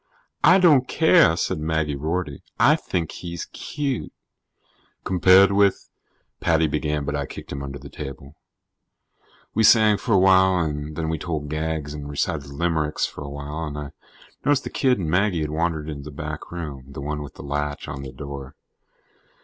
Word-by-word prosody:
"I 175 +7 +7
don't 150 -9 +5
care," 160 - +5
said 80 - -1
Maggie 80 -1 -1
Rorty. 80 0 -3 0.2
"I - - +6
think 85 -3 -3
he's 85 -1 -6
cute." 140 -4 -4 0.9
"Compared 95 +2 +5
with 100 -1 +2 0.2
" - - -46
Paddy 80 -1 +3
began, 75 -1 -1
but 75 +1 -2
I 70 -1 -2
kicked - - -9
him 70 - -4
under 70 0 -6
the 70 +1 -11
table. 70 0 -8 1.2
We 110 - +1
sang 110 -1 +6
for 115 - -1
a - - +6
while, 95 0 +5
and 75 -2 -2
then 80 0 -2
we 80 -1 -2
told 75 -3 -4
gags 80 -1 -2
and 75 -1 -7
recited 70 0 -2
limericks 75 +1 -1
for - - -8
a 70 - -7
while, 75 +3 -5
and 75 0 -6
I 75 -1 -6 0.5
noticed 145 -1 +2
that - - -6
the - - -5
kid 130 -2 +3
and 90 -5 -3
Maggie 90 +1 +1
had 75 -1 -2
wandered 80 -1 -1
into 70 -2 -6
the 75 - -7
back 75 0 -6
room 75 -7 -6
the 70 - -7
one 75 +1 -3
with 70 -2 -9
the - - -10
latch 75 +1 -3
on 70 - -6
the 70 -1 -7
door. 70 +1 -8
75 Hz, 185 wpm, -23 LUFS, 75-90 Hz, 1.2 s, I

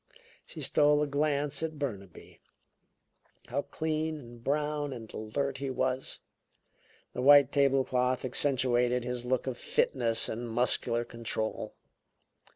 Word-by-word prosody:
She - - -8
stole 150 0 +3
a - - +1
glance 145 0 0
at 160 -1 -3
Burnaby. 100 - -7 1.1
How 140 +3 0
clean 155 +1 -2
and 120 -3 -13
brown 150 0 -1
and 115 -3 -10
alert 135 +5 -3
he 135 -1 -3
was! 130 0 -2 1.0
The 125 - -3
white 140 0 +7
table 135 -1 +3
cloth 125 0 0
accentuated 125 -2 +1
his 125 0 -3
look 125 0 0
of 130 -2 -3
fitness 115 -4 +1
and 120 +2 -4
muscular 120 0 +1
control. 115 -2 -4
130 Hz, 125 wpm, -30 LUFS, 120-145 Hz, 1.1 s, white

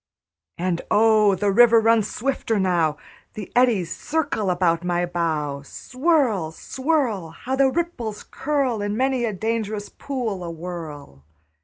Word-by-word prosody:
And 175 -1 -1
oh, 215 -2 +4
the 200 +1 +1
river 235 +2 +6
runs 225 -2 +3
swifter 235 -3 -1
now; 170 -5 +1 0.4
The 210 -3 -7
eddies 225 -9 +2
circle 290 -10 -1
about 175 -2 +1
my 175 0 0
bow. 155 -5 -2
Swirl, 255 - 0
swirl! 260 - -1
How 250 +11 -4
the 270 0 +4
ripples 260 -9 -3
curl 270 -6 -1
In 205 +1 -2
many 260 -1 +1
a 225 - -1
dangerous 215 0 -3
pool 235 -9 -4
awhirl! 165 - -7
210 Hz, 130 wpm, -23 LUFS, 175-250 Hz, 0.4 s, river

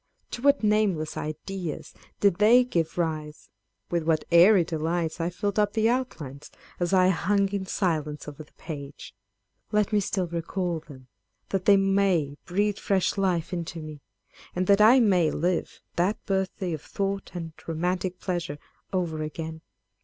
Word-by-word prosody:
To 235 - -5
what 280 -2 +3
nameless 205 -7 +1
ideas 160 +2 -5 0.3
did 200 -4 +4
they 230 +4 +6
give 170 -10 -2
rise, 155 -3 -3
â€" - - -40
with 170 -1 +1
what 160 -1 +1
airy 180 +3 +7
delights 165 +1 -2
I 165 - 0
filled 200 +4 -2
up 210 -1 +2
the 225 0 +2
outlines, 155 - -4 0.3
as 175 -1 0
I 185 -1 +5
hung 195 +2 +2
in 195 -1 -3
silence 155 -7 -1
over 150 +1 -8
the - - -25
page! 145 - -8 0.6
â€" - - -27
Let 210 0 +2
me 210 - +4
still 190 -2 -1
recall 170 +1 -2
them, 135 -4 -14 0.4
that 190 -2 -2
they 200 -1 +7
may 195 -7 +2
breathe 205 +3 0
fresh 190 -2 +1
life 185 -4 0
into 170 -1 -4
me, 155 -2 -8 0.5
and 185 +1 0
that 200 +2 +5
I 235 +5 +8
may 185 -8 +4
live 175 +4 -2 0.2
that 185 +5 +2
birthday 190 -2 -1
of 155 - -4
thought 195 0 -3
and 165 -2 -5
romantic 180 +2 -2
pleasure 175 -5 -3 0.3
over 170 -4 -1
again 160 +1 -5
180 Hz, 160 wpm, -26 LUFS, 160-200 Hz, 0.6 s, I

